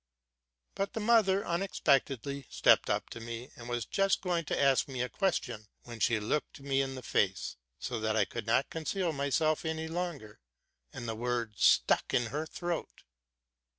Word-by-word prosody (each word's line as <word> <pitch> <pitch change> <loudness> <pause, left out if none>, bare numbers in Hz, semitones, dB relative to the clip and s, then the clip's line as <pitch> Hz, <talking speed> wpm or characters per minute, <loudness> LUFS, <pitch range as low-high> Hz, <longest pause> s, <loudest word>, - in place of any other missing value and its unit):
But 195 0 -2
the - - -2
mother 210 -3 +4
unexpectedly 140 - 0
stepped - - +4
up - - -1
to - - -6
me, 115 +2 -7
and 120 0 -9
was 120 -2 -1
just 195 0 +1
going 175 -3 0
to - - -1
ask 135 -2 +4
me 130 -3 -2
a 125 - -3
question, 125 - -1 0.2
when 120 -1 -9
she 115 0 +3
looked 115 +10 -2
me 135 0 +1
in 135 -1 -3
the 130 - -8
face, 95 -2 0 0.2
so 120 - -4
that 110 0 0
I 105 - +4
could 105 - -6
not 115 +4 +2
con 160 -1 -5
ceal 185 -3 0
myself 150 +2 +1
any 160 0 -2
longer, 165 -10 -4 0.5
and 120 - -7
the 115 - -1
words 115 -2 -2
stuck - - +4
in 120 -3 +1
her 155 +2 -2
throat. 175 0 -4
135 Hz, 180 wpm, -31 LUFS, 120-165 Hz, 0.5 s, mother